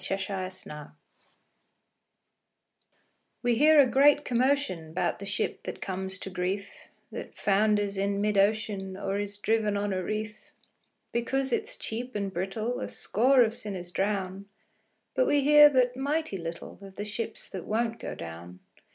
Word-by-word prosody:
0 195 - -1
Autoplay 185 -6 -6 2.5
We 245 0 +3
hear 300 +5 +6
a 280 - +8
great 285 +3 +4
commotion 240 - 0
'Bout - - 0
the 200 - -7
ship 205 +1 -2
that - - -6
comes 190 0 -4
to 195 - -7
grief, 190 +2 -4 0.2
That - - -8
founders 205 0 +2
in 200 0 0
mid 210 0 +1
ocean, 200 -1 +1
Or 195 0 -2
is 205 0 -4
driven 210 -1 +1
on 200 -1 -1
a 185 - -1
reef; 215 +2 -5 0.6
Because 265 +2 -1
it's - - -2
cheap 245 +2 -5
and 200 -2 -2
brittle 215 +7 -2
A - - -3
score 255 +4 +3
of 225 -1 0
sinners 190 -6 -6
drown. 195 0 -2 0.7
But - - +2
we 290 - +3
hear 295 +1 +9
but 250 -3 +2
mighty 285 - -1
little 170 0 -7
Of 195 -1 -11
the 205 - -4
ships 220 +1 -5
that 185 - -6
won't 230 +1 -1
go - - -5
down. 85 +2 -9
205 Hz, 150 wpm, -28 LUFS, 190-240 Hz, 2.5 s, hear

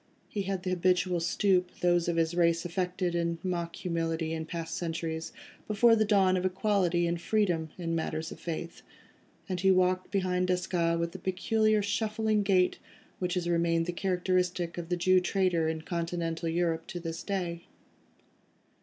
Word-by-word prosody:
He 205 - -2
had 190 -1 -3
the 185 - -2
habitual 180 0 +2
stoop, 180 +1 +2
those 175 -1 +3
of 170 - 0
his 165 0 +1
race 170 -1 +2
affected 180 0 -1
in 170 -1 0
mock 170 -2 -2
humility 165 -2 -2
in 160 0 -4
past 165 -1 -4
centuries, 165 -2 -3 0.4
before 225 +2 +5
the 215 -1 +2
dawn 195 -3 +4
of 185 - 0
equality 185 -2 +1
and 170 0 -1
freedom 175 -7 +1
in 170 -2 -3
matters 160 0 -2
of - - -9
faith, 170 0 -5 0.7
and 185 -2 -2
he 190 +2 +3
walked 185 0 +2
behind 185 -2 0
Desgas 175 -2 +1
with 170 0 -1
the 190 - -8
peculiar 215 +3 +1
shuffling 215 +1 0
gait 185 -2 +2 0.4
which 180 0 -1
has 175 -1 -1
remained 170 -1 +2
the 175 - -2
characteristic 180 -1 0
of 170 0 -7
the 175 - 0
Jew 185 +2 +4
trader 180 -3 +1
in 160 0 -4
continental 170 -1 -2
Europe 165 -1 0
to 175 - -5
this 165 0 -5
day. 175 -4 -3
175 Hz, 165 wpm, -29 LUFS, 170-185 Hz, 0.7 s, before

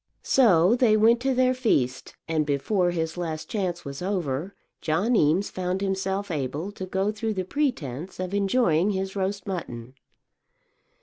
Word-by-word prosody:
So 205 -5 +4
they 235 -4 +4
went 230 +2 +5
to 265 +1 0
their 255 0 +3
feast, 135 - 0
and 160 -1 +1
before 175 +6 +1
his 165 -1 -2
last 160 -3 -4
chance 180 -5 -2
was 140 +2 -6
over 180 -2 -2 0.3
John 190 +10 +1
Eames 175 +2 +2
found 185 +1 -2
himself 195 0 -2
able 150 +5 -3
to 190 -2 -7
go 190 +3 0
through 215 0 -3
the 185 -1 -2
pretence 185 - -3
of 185 +1 -4
enjoying 200 -3 +2
his 190 -1 -2
roast 195 0 -2
mutton. 130 - -6
190 Hz, 150 wpm, -25 LUFS, 160-210 Hz, 0.3 s, went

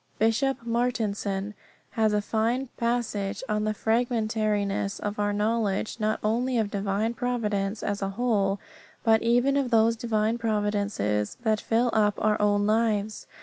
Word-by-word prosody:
Bishop 235 +3 +1
Martensen 215 -4 -1 0.4
has 220 -2 +2
a 210 0 +1
fine 235 +5 0
passage 225 -3 -1
on 210 -1 0
the 215 - 0
fragmentariness 215 -4 0
of 205 0 -4
our 205 0 +1
knowledge, 210 0 -1
not 215 0 0
only 240 +4 +1
of 215 -3 0
divine 200 +3 -1
providence 215 -4 -2
as 205 0 -2
a 195 - -1
whole, 200 -2 0 0.4
but 220 -1 +4
even 245 +4 +3
of 275 -3 +1
those 230 0 +4
divine 225 -1 0
providences 205 - -1
that 220 -2 +1
fill 235 +1 +1
up 210 -2 +3
our 215 -1 +1
own 205 0 +2
lives. 215 -1 0
215 Hz, 145 wpm, -26 LUFS, 205-230 Hz, 0.4 s, but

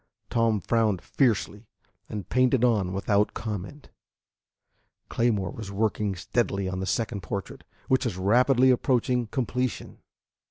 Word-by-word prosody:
Tom 115 -3 +2
frowned 110 -1 +1
fiercely, 110 -4 0 0.4
and 105 -4 -5
painted 130 0 +2
on 105 -7 +1
without 100 +2 +1
comment. 110 +6 -6 1.2
Claymore 105 -6 0
was 105 -3 -8
working 105 -1 -1
steadily 100 -1 -1
on 95 0 -3
the 95 - -3
second 105 +2 -1
portrait, 100 +2 -6 0.2
which 130 0 +2
was 105 -7 -2
rapidly 125 +6 +4
approaching 125 -1 +1
completion. 125 0 -3
110 Hz, 120 wpm, -26 LUFS, 100-125 Hz, 1.2 s, rapidly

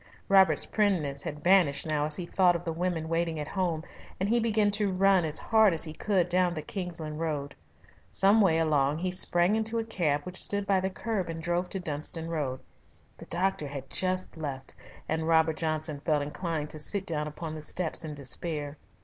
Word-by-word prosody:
Robert's 195 -1 +5
primness 170 -10 0
had 150 -2 -6
vanished 175 -6 +4
now 150 -2 0
as 150 0 +1
he 180 - -3
thought 180 0 +3
of 170 - -4
the 165 - -3
women 170 -1 -2
waiting 165 -1 -1
at 150 - -4
home, 175 -5 -1 0.4
and 190 - 0
he 235 +3 +3
began 215 -2 +2
to 205 -1 0
run 190 -1 +4
as 155 0 -2
hard 220 -5 +4
as 160 - -1
he 155 -2 -6
could 185 0 +1
down 180 0 +2
the 155 - -4
Kingsland 165 -5 -5
Road. 150 -3 -3 0.6
Some 200 +3 +4
way 170 -5 +4
along 150 -3 +2
he 180 +2 -2
sprang 180 +2 +3
into 220 +1 -1
a 225 - 0
cab 160 -10 0
which 180 +3 -2
stood 200 0 +1
by 195 -1 +3
the 190 +1 -1
curb 195 -2 -3
and 165 0 -4
drove 175 +2 -1
to 195 - -2
Dunstan 160 0 -5
Road. 140 -6 -2 0.5
The - - -12
doctor 180 -3 -1
had 140 -1 -8
just 185 0 -1
left, 135 -4 -5 0.3
and 160 0 -1
Robert 160 -1 +3
Johnson 155 -2 -2
felt 150 0 +1
inclined 150 0 -3
to 155 - -8
sit 195 +6 -2
down 150 -3 -2
upon 155 +1 -6
the 155 - -6
steps 170 +2 -3
in 155 -2 -6
despair. 145 +1 -2
165 Hz, 200 wpm, -29 LUFS, 155-190 Hz, 0.6 s, Robert's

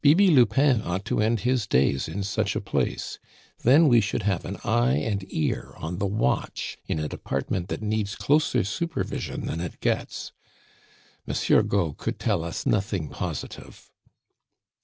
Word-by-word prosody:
"Bibi 175 +7 +6
Lupin 135 -2 +4
ought 95 0 -3
to 105 - 0
end 110 +1 +1
his 125 -4 +1
days 70 -2 +2
in 95 +5 -4
such 95 - -1
a - - +1
place. - - -2 0.4
Then 145 +7 +6
we 120 -4 +6
should 110 +1 -2
have 95 -3 0
an - - -5
eye 60 +2 +2
and 100 +6 -1
ear 80 - -2
on 85 +3 -5
the 100 - 0
watch 95 -10 -1
in - - -1
a 75 0 -2
department 80 +8 -3
that - - -4
needs 105 -2 -1
closer 150 +8 +2
supervision 160 - -3
than 80 - -3
it 90 - -6
gets. - - -2 1.0
Monsieur - - +3
Gault 80 -4 0
could - - -3
tell 100 -8 0
us 85 - -4
nothing 95 -6 0
positive." - - -6
100 Hz, 160 wpm, -26 LUFS, 85-120 Hz, 1.0 s, Bibi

